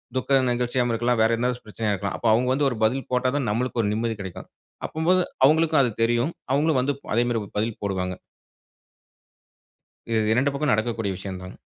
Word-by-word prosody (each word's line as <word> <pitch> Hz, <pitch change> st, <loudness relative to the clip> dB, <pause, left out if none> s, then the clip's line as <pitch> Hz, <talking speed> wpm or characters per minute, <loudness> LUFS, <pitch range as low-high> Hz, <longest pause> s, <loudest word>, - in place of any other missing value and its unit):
துக்க 135 Hz, +1 st, +2 dB
நிகழ்ச்சியாவும் 120 Hz, 0 st, 0 dB
இருக்கலாம், 120 Hz, +1 st, +1 dB
வேறு 115 Hz, +1 st, +3 dB
எதனாச்சும் 125 Hz, 0 st, -2 dB
பிரச்சனையா 105 Hz, 0 st, -2 dB
இருக்கலாம். 100 Hz, 0 st, -3 dB
அப்ப 120 Hz, -, -2 dB
அவுங்க 125 Hz, +3 st, +2 dB
வந்து 140 Hz, +1 st, +2 dB
ஒரு 125 Hz, -, -4 dB
பதில் 130 Hz, +5 st, +1 dB
போட்டா 125 Hz, 0 st, +2 dB
தான் 130 Hz, -6 st, -1 dB
நம்மளுக்கு 120 Hz, +2 st, -1 dB
ஒரு 105 Hz, -, 0 dB
நிம்மதி 115 Hz, +1 st, -1 dB
கெடைக்கும். 95 Hz, -3 st, -8 dB, 0.4 s
அப்படினும்போது 175 Hz, +4 st, +2 dB, 0.2 s
அவுங்களுக்கும் 155 Hz, 0 st, +4 dB
அது 120 Hz, -, 0 dB
தெரியும். 120 Hz, +6 st, +1 dB, 0.2 s
அவுங்களும் 150 Hz, 0 st, +2 dB
வந்து 140 Hz, +3 st, 0 dB
ப் -, -, -14 dB
அதே 120 Hz, -, +4 dB
மாரி 115 Hz, -1 st, 0 dB, 0.2 s
பதில் 110 Hz, 0 st, -2 dB
போடுவாங்க. 90 Hz, -2 st, -2 dB, 1.9 s
இது 110 Hz, -1 st, +2 dB
2 130 Hz, +5 st, +2 dB
பக்கமும் 145 Hz, -1 st, 0 dB
நடக்கக்கூடிய 110 Hz, -2 st, -1 dB
விஷயம் 95 Hz, 0 st, -6 dB
தாங்க. 90 Hz, -, -9 dB
120 Hz, 180 wpm, -24 LUFS, 110-135 Hz, 1.9 s, அவுங்களுக்கும்